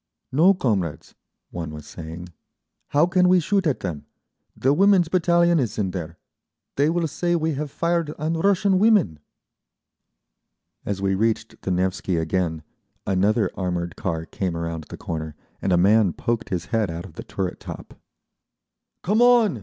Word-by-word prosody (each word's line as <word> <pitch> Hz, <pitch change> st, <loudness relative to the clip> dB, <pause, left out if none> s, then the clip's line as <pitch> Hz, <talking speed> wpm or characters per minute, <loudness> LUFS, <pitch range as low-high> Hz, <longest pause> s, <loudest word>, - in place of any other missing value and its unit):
"No, 170 Hz, +9 st, +5 dB
comrades," 100 Hz, -, -2 dB, 0.4 s
one 85 Hz, -2 st, -5 dB
was 75 Hz, -1 st, -9 dB
saying. 80 Hz, +3 st, -8 dB, 0.6 s
"How 145 Hz, +3 st, +3 dB
can 180 Hz, 0 st, +3 dB
we 185 Hz, 0 st, +5 dB
shoot 190 Hz, +2 st, +1 dB
at 145 Hz, -, -1 dB
them? 85 Hz, -6 st, -5 dB, 0.5 s
The 135 Hz, +2 st, +2 dB
Women's 190 Hz, 0 st, +4 dB
Battalion 170 Hz, -1 st, +3 dB
is 120 Hz, -6 st, -2 dB
in 100 Hz, -4 st, -1 dB
there—they 90 Hz, -, -5 dB
will 170 Hz, 0 st, 0 dB
say 175 Hz, +4 st, -1 dB
we 160 Hz, -1 st, 0 dB
have 145 Hz, +1 st, -4 dB
fired 170 Hz, +1 st, -1 dB
on 155 Hz, +2 st, -1 dB
Russian 190 Hz, +2 st, +2 dB
women." 200 Hz, -, +3 dB, 1.7 s
As 100 Hz, -1 st, -2 dB
we 95 Hz, 0 st, +2 dB
reached 110 Hz, +2 st, -1 dB
the -, -, -4 dB
Nevsky 90 Hz, 0 st, 0 dB
again 80 Hz, -1 st, -1 dB, 0.4 s
another 100 Hz, +4 st, +1 dB
armoured 90 Hz, -2 st, -3 dB
car 80 Hz, -6 st, -3 dB
came 90 Hz, -1 st, -3 dB
around 85 Hz, -2 st, -4 dB
the -, -, -10 dB
corner, 80 Hz, -2 st, -5 dB, 0.3 s
and 95 Hz, -, 0 dB
a 90 Hz, -, +4 dB
man 100 Hz, 0 st, +4 dB
poked 115 Hz, -1 st, -2 dB
his 90 Hz, -4 st, -2 dB
head 110 Hz, -4 st, +1 dB
out 85 Hz, +1 st, -5 dB
of -, -, -12 dB
the -, -, -8 dB
turret 95 Hz, -2 st, -4 dB
top. -, -, -9 dB, 1.1 s
"Come 210 Hz, +6 st, +2 dB
on!" 235 Hz, -, +5 dB
110 Hz, 155 wpm, -23 LUFS, -, 1.7 s, No